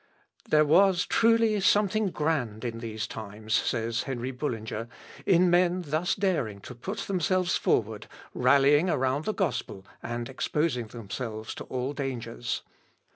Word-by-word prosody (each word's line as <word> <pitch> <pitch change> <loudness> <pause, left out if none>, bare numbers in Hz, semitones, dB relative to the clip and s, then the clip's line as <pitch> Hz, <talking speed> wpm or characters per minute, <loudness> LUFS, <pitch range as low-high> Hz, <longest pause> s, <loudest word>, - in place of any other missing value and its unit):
"There 155 0 +5
was 180 +4 +4
truly 230 -2 +3
something 205 +2 +3
grand 135 -10 -1
in 115 -1 -3
these 110 -2 -4
times," 110 0 -6
says 115 +1 0
Henry 130 -1 -4
Bullinger, 115 -4 -4 0.4
"in 180 -1 +5
men 180 +1 +3
thus 155 +5 0
daring 150 - -1
to 125 - -9
put 190 - -5
themselves 185 -1 +1
forward, 110 -1 0 0.3
rallying 140 +6 +4
around 135 0 0
the - - +1
gospel, 130 - -2 0.2
and 120 0 -4
exposing 135 -2 -1
themselves 110 0 -6
to - - -8
all 130 +2 -3
dangers. 120 -4 -4
135 Hz, 130 wpm, -28 LUFS, 115-180 Hz, 0.4 s, There